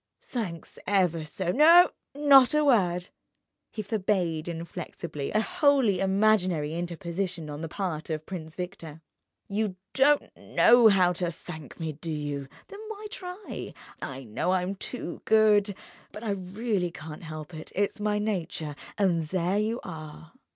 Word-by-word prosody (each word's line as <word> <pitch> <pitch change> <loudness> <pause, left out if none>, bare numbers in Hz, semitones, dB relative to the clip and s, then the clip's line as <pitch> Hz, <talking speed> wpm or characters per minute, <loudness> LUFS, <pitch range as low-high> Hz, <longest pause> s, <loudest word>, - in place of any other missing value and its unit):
"Thanks 185 -10 -5
ever 180 -5 +2
so... 175 +3 -2
No, 330 - +7 0.2
not 280 -2 +6
a 300 0 +3
word!" 180 -9 +2 0.6
He 215 - -5
forbade 185 -6 0
inflexibly 170 -3 -5
a 215 - +2
wholly 280 - +3
imaginary 190 -6 +2
interposition 170 -1 -4
on 145 +1 -6
the 165 - -3
part 170 -4 -3
of 155 -1 -3
Prince 160 -4 -7
Victor. 165 -4 -7 0.4
"You 205 -1 -1 0.2
don't 290 +2 +3
know 240 -1 +5
how 185 -4 +5
to 175 0 -2
thank 160 -3 -10
me—do 160 0 -4
you? 145 -2 -3 0.2
Then 400 - -9
why 430 -1 -7
try? 365 +2 -7 0.3
I 135 0 -5
know 125 +11 -1
I'm 185 +1 0
too 195 -2 -6
good, 210 -2 +4 0.4
but 210 - -9
I 220 - -1
really 195 0 -1
can't 150 -1 -9
help 155 0 -8
it, 155 0 -8
it's 205 +1 0
my 210 0 +1
nature—and 175 -3 -1
there 185 +3 0
you 225 +3 0
are! 155 -2 -9
185 Hz, 140 wpm, -28 LUFS, 165-215 Hz, 0.6 s, No